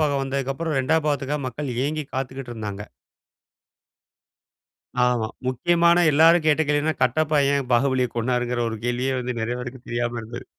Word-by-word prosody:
பாகம் 140 Hz, -3 st, +1 dB
வந்ததுக்கப்புறம், 135 Hz, +3 st, -2 dB
2வது 155 Hz, +3 st, +1 dB
பாகத்துக்காக 145 Hz, 0 st, -1 dB
மக்கள் 135 Hz, 0 st, -5 dB
ஏங்கி 155 Hz, 0 st, -3 dB
காத்துக்கிட்டு 130 Hz, -1 st, -4 dB
இருந்தாங்க. 105 Hz, -2 st, -5 dB, 2.2 s
ஆமா. 120 Hz, -3 st, +1 dB, 0.2 s
முக்கியமான 170 Hz, +6 st, +3 dB
எல்லாரும் 160 Hz, +3 st, +5 dB
கேட்ட 155 Hz, +1 st, +4 dB
கேள்வின்னா, 150 Hz, +2 st, +1 dB
கட்டப்பா 150 Hz, +4 st, +2 dB
ஏன் 140 Hz, -3 st, -1 dB
பாகுபலிய 130 Hz, 0 st, +2 dB
கொன்னாருங்கிற 125 Hz, +1 st, 0 dB
ஒரு 110 Hz, -, -4 dB
கேள்வியே 125 Hz, +2 st, 0 dB
வந்து, 125 Hz, -1 st, -4 dB
நிறைய 120 Hz, +2 st, -2 dB
பேருக்கு 125 Hz, 0 st, -8 dB
தெரியாம 120 Hz, 0 st, -2 dB
இருந்தது. 120 Hz, +3 st, -8 dB
130 Hz, 135 wpm, -23 LUFS, 120-150 Hz, 2.2 s, எல்லாரும்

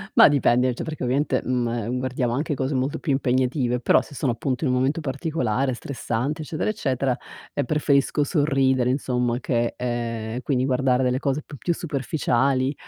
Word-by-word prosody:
Ma -, -, +9 dB
dipende, 130 Hz, -3 st, +3 dB
cioè -, -, -4 dB
perché 155 Hz, -3 st, -5 dB
ovviamente, 130 Hz, +1 st, +1 dB
mhm, 125 Hz, -2 st, 0 dB
e 115 Hz, -2 st, -3 dB
guardiamo 125 Hz, -1 st, -1 dB
anche 150 Hz, +5 st, -1 dB
cose 135 Hz, 0 st, -2 dB
molto 130 Hz, +2 st, -1 dB
più 150 Hz, -, -2 dB
impegnative, 130 Hz, -1 st, +1 dB
però 120 Hz, -, +4 dB
se -, -, -13 dB
sono 135 Hz, -2 st, 0 dB
appunto 125 Hz, +4 st, -2 dB
in 145 Hz, -, +2 dB
un 125 Hz, -, +2 dB
momento 135 Hz, +6 st, +1 dB
particolare, 135 Hz, -3 st, -1 dB
stressante 135 Hz, +3 st, -3 dB
eccetera, 155 Hz, +6 st, -2 dB
eccetera, 135 Hz, -, -1 dB, 0.4 s
ehm, -, -, -1 dB
preferisco 145 Hz, 0 st, +2 dB
sorridere 135 Hz, -5 st, +2 dB
insomma 125 Hz, -3 st, 0 dB
che 120 Hz, -3 st, 0 dB
ehm, 115 Hz, -1 st, -3 dB
quindi 130 Hz, -1 st, 0 dB
guardare 130 Hz, -1 st, +2 dB
delle 125 Hz, 0 st, +1 dB
cose 140 Hz, +1 st, -1 dB
p 145 Hz, -, -11 dB
più 170 Hz, +8 st, -1 dB
superficiali, 135 Hz, -3 st, 0 dB
130 Hz, 170 wpm, -24 LUFS, 125-145 Hz, 0.4 s, Ma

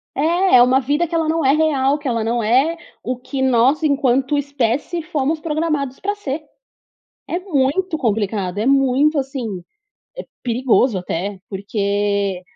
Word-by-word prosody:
É, 340 Hz, +3 st, +3 dB
é 245 Hz, -, +8 dB
uma 260 Hz, +2 st, +3 dB
vida 290 Hz, +7 st, 0 dB
que 335 Hz, -, -4 dB
ela 325 Hz, -1 st, +1 dB
não 325 Hz, 0 st, 0 dB
é 270 Hz, -, +5 dB
real, 290 Hz, -3 st, +2 dB
que 290 Hz, -1 st, -7 dB
ela 230 Hz, -3 st, 0 dB
não 230 Hz, +1 st, -1 dB
é 265 Hz, +10 st, +2 dB, 0.3 s
o 255 Hz, 0 st, -3 dB
que 260 Hz, +2 st, -5 dB
nós 265 Hz, +3 st, +3 dB
enquanto 275 Hz, -1 st, +2 dB
espécie 280 Hz, +4 st, -1 dB
fomos 310 Hz, 0 st, -1 dB
programados 305 Hz, -4 st, -2 dB
pra 410 Hz, +1 st, -2 dB
ser. 305 Hz, -6 st, -5 dB, 0.9 s
É 345 Hz, -, -1 dB
muito 320 Hz, 0 st, 0 dB
complicado, 205 Hz, -5 st, -1 dB
é 215 Hz, -, -1 dB
muito 275 Hz, +2 st, +3 dB
assim, 260 Hz, -8 st, -4 dB, 0.6 s
é -, -, -20 dB, 0.2 s
perigoso 245 Hz, -2 st, +2 dB
até, 185 Hz, +2 st, -4 dB
porque, 200 Hz, -1 st, -1 dB
270 Hz, 155 wpm, -19 LUFS, 230-305 Hz, 0.9 s, é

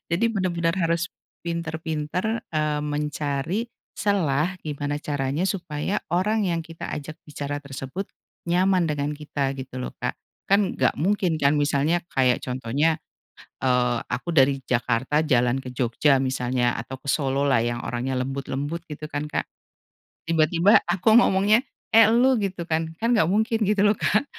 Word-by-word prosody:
Jadi 215 Hz, +8 st, +1 dB
bener-bener 175 Hz, -4 st, 0 dB
harus 170 Hz, +1 st, 0 dB, 0.3 s
pintar-pintar 170 Hz, +5 st, -2 dB
eee, 150 Hz, -1 st, 0 dB
mencari, 150 Hz, -, -2 dB, 0.2 s
selah 180 Hz, -4 st, 0 dB
gimana 145 Hz, -1 st, -3 dB
caranya 145 Hz, +2 st, -2 dB
supaya 185 Hz, -1 st, -2 dB
orang 195 Hz, +4 st, +1 dB
yang 165 Hz, -2 st, -1 dB
kita 165 Hz, 0 st, -8 dB
ajak 150 Hz, +1 st, -6 dB
bicara 145 Hz, 0 st, -4 dB
tersebut, 140 Hz, +7 st, -6 dB, 0.4 s
nyaman 180 Hz, 0 st, +3 dB
dengan 145 Hz, -1 st, -1 dB
kita 145 Hz, -2 st, -2 dB
gitu 130 Hz, -1 st, -8 dB
loh 125 Hz, -, -4 dB
Kak, -, -, -2 dB, 0.3 s
kan 200 Hz, 0 st, +3 dB
enggak -, -, +1 dB
mungkin 180 Hz, +1 st, +1 dB
kan 145 Hz, -2 st, +3 dB
misalnya, 145 Hz, +3 st, +2 dB, 0.2 s
kayak 125 Hz, -2 st, +4 dB
contohnya, 130 Hz, +6 st, 0 dB, 0.7 s
eee, 125 Hz, -2 st, +2 dB
aku 170 Hz, +7 st, -3 dB
dari 135 Hz, -3 st, +4 dB
Jakarta 125 Hz, +4 st, +1 dB
jalan 130 Hz, -4 st, +2 dB
ke 130 Hz, -, -9 dB
Jogja 130 Hz, +4 st, +3 dB
misalnya 125 Hz, -1 st, 0 dB
atau 130 Hz, +3 st, -7 dB
ke -, -, -46 dB
Solo 140 Hz, -1 st, 0 dB
lah 135 Hz, -5 st, +3 dB
yang 120 Hz, +1 st, -2 dB
orangnya 125 Hz, +2 st, -2 dB
lembut-lembut 135 Hz, +4 st, -3 dB
gitu 150 Hz, 0 st, -7 dB
kan 145 Hz, +1 st, -3 dB
Kak, -, -, -1 dB, 0.8 s
tiba-tiba 165 Hz, +4 st, +4 dB
aku 185 Hz, +4 st, +3 dB
ngomongnya, 215 Hz, -1 st, +5 dB, 0.3 s
"Eh 225 Hz, -1 st, +8 dB
elu!" 245 Hz, +2 st, +4 dB
gitu 190 Hz, -3 st, -3 dB
kan, 160 Hz, -1 st, -1 dB
kan 230 Hz, +6 st, 0 dB
enggak 165 Hz, -9 st, +3 dB
mungkin 220 Hz, +4 st, +1 dB
gitu 205 Hz, -1 st, +3 dB
loh 205 Hz, 0 st, +4 dB
Kak, 210 Hz, +7 st, +2 dB
155 Hz, 150 wpm, -24 LUFS, 135-185 Hz, 0.8 s, Eh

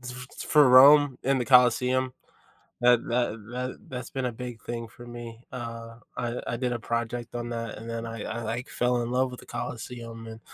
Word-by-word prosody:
f 125 Hz, 0 st, -7 dB, 0.2 s
f -, -, -5 dB
or 145 Hz, -3 st, +8 dB
Rome 140 Hz, +1 st, +8 dB
in 135 Hz, 0 st, +2 dB
the 125 Hz, -, -1 dB
Colosseum, 125 Hz, 0 st, +4 dB, 0.7 s
that 120 Hz, -1 st, +5 dB
that 120 Hz, -1 st, +1 dB, 0.2 s
that 125 Hz, +1 st, -3 dB
that's 125 Hz, -2 st, -6 dB
been 135 Hz, -2 st, -3 dB
a 125 Hz, -, -1 dB
big 120 Hz, -1 st, -7 dB
thing 115 Hz, -1 st, -5 dB
for 120 Hz, +2 st, -13 dB
me. 120 Hz, -1 st, -9 dB
Uh, 115 Hz, -1 st, -7 dB, 0.2 s
I 120 Hz, 0 st, -2 dB
I 120 Hz, -, -2 dB
did 125 Hz, 0 st, -1 dB
a 120 Hz, -, -2 dB
project 115 Hz, +1 st, -3 dB
on 120 Hz, 0 st, -4 dB
that, 115 Hz, -2 st, -4 dB
and 115 Hz, +2 st, -8 dB
then 115 Hz, 0 st, -4 dB
I 115 Hz, -1 st, -6 dB
I 115 Hz, +1 st, -4 dB
like 115 Hz, +3 st, -4 dB
fell 125 Hz, 0 st, +1 dB
in 120 Hz, -, -3 dB
love 130 Hz, +1 st, +1 dB
with 125 Hz, -, -9 dB
the -, -, -14 dB
Colosseum, 115 Hz, -1 st, -6 dB
and 110 Hz, 0 st, -9 dB
120 Hz, 210 wpm, -27 LUFS, 115-125 Hz, 0.7 s, or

